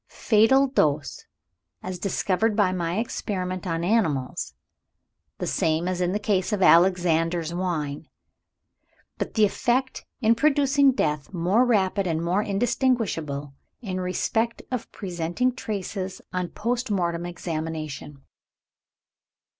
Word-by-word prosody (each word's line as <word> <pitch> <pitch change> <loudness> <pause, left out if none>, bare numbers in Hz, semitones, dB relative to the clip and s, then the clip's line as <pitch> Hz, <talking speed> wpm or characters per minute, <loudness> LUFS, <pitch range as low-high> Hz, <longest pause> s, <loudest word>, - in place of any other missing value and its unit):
Fatal 225 +6 +6
dose, 150 - 0 0.6
as 185 -1 -5
discovered 200 +3 0
by 185 -4 +1
experiment 185 -4 -3
on 165 -1 -1
animals, 165 - 0 0.8
the - - -3
same 160 +2 0
as 180 -1 -1
in 180 0 +1
the 205 - 0
case 205 -2 0
of 205 -3 +1
'Alexander's 170 -2 +3
Wine.' 160 -5 -3 1.1
But - - -4
the 215 -2 +5
effect, 250 +5 0 0.2
in 230 -3 +4
producing 280 0 +3
death, 150 - -1
more 185 +9 +3
rapid, 200 -4 +2
and 160 -2 0
more 175 +4 +1
indistinguishable, 200 - -1 0.3
in 185 -3 -3
respect 225 +5 -1
of 250 -3 -4
presenting 180 +6 -2
traces 195 -4 -4
on 180 -1 -2
post 240 +3 -2
mortem 175 -3 -1
examination." 155 -5 -5
185 Hz, 115 wpm, -25 LUFS, 170-220 Hz, 1.1 s, Fatal